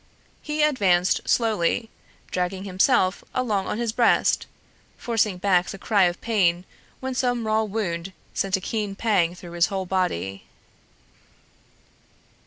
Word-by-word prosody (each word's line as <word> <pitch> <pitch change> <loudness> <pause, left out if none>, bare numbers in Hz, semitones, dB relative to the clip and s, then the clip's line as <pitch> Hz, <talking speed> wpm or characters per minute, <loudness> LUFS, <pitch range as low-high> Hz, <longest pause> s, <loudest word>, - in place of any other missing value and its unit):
He 300 0 -1
advanced 190 -12 +2
slowly, 225 -1 +1 0.4
dragging 185 +1 -2
himself 185 -1 +2
along 215 -7 0
on - - -2
his 235 -1 -1
breast, 235 0 +2 0.5
forcing 220 -5 0
back 180 -1 +2
the - - -6
cry 200 -1 +3
of 175 0 -1
pain 185 -6 +1 0.4
when 260 0 -3
some 245 -2 0
raw 215 0 +2
wound 195 -5 -3 0.2
sent 195 -1 0
a - - -8
keen 210 -1 -3
pang 190 -6 +1
through 175 -1 -11
his 170 0 +2
whole 195 -2 -3
body. 100 - -2
195 Hz, 130 wpm, -24 LUFS, 180-225 Hz, 0.5 s, cry